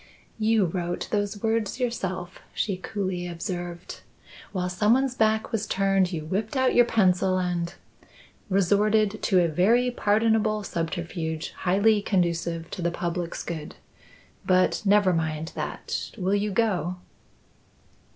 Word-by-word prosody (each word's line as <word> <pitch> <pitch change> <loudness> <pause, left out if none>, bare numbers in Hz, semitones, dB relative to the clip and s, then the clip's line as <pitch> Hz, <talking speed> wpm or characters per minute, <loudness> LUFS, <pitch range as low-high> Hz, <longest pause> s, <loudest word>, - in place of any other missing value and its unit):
"You 220 -2 +3
wrote 175 0 -3
those 205 0 -1
words 225 +1 0
yourself," 190 -7 -3 0.2
she 200 - 0
coolly 185 -2 -3
observed. 175 0 -6 0.5
"While 180 -3 -2
someone's 230 +8 +2
back 220 -2 +1
was 220 -2 -1
turned, 195 -1 +2
you 160 -3 -4
whipped 205 - -2
out 260 0 +3
your 245 - +6
pencil 190 -4 +2
and 175 -2 -1 0.4
" - - -26
"Resorted 205 +2 +2
to 185 -2 +3
a - - +2
very 225 +10 +3
pardonable 215 -1 +2
subterfuge 165 -2 -3
highly 205 +4 +2
conducive 170 -3 -1
to - - -5
the 170 - +1
public's 170 0 -3
good. 160 -3 -6 0.7
But 185 0 +2
never 200 -2 +4
mind 160 -1 -2
that. - - -4
Will 190 -1 0
you 205 +1 +1
go?" 190 -4 0
190 Hz, 130 wpm, -26 LUFS, 175-215 Hz, 0.7 s, your